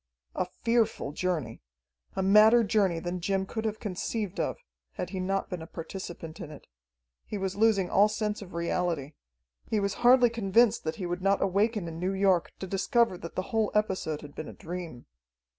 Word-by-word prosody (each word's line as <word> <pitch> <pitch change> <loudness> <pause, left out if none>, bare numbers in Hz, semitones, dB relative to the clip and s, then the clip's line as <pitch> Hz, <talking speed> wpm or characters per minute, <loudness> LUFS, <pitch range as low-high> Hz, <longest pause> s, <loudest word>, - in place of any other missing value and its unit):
A - - -1 0.2
fearful 230 -10 +1
journey! 155 -8 -2 0.5
A 190 - 0
madder 215 +4 +7
journey 195 -4 +2
than 175 +1 -4
Jim 190 +1 0
could 220 +3 -4
have 220 0 -2
conceived 205 0 -3
of, - - -1 0.4
had 180 - -5
he 190 - -3
not 195 +1 -1
been 180 -3 -5
a 160 - -8
participant 165 -1 -7
in 150 - -7
it. 150 - -12 0.6
He 210 - -5
was 190 -1 -2
losing 205 -3 +3
all 205 +2 +6
sense 210 0 -2
of 185 -4 -10
reality. 170 -4 -1 0.6
He 220 - +1
was 200 -1 0
hardly 245 -1 +6
convinced 230 0 +3
that 160 - -1
he 190 - -5
would 175 +1 -3
not 195 +1 +3
awaken 200 0 +1
in 165 0 -6
New 185 +2 -1
York, 190 -3 +2
to - - -5
discover 200 +3 +2
that 170 - -8
the 185 - -1
whole 220 -2 +2
episode 190 -7 0
had 145 -1 -11
been 155 - -6
a - - -8
dream. 170 -7 -7
190 Hz, 190 wpm, -29 LUFS, 175-210 Hz, 0.6 s, madder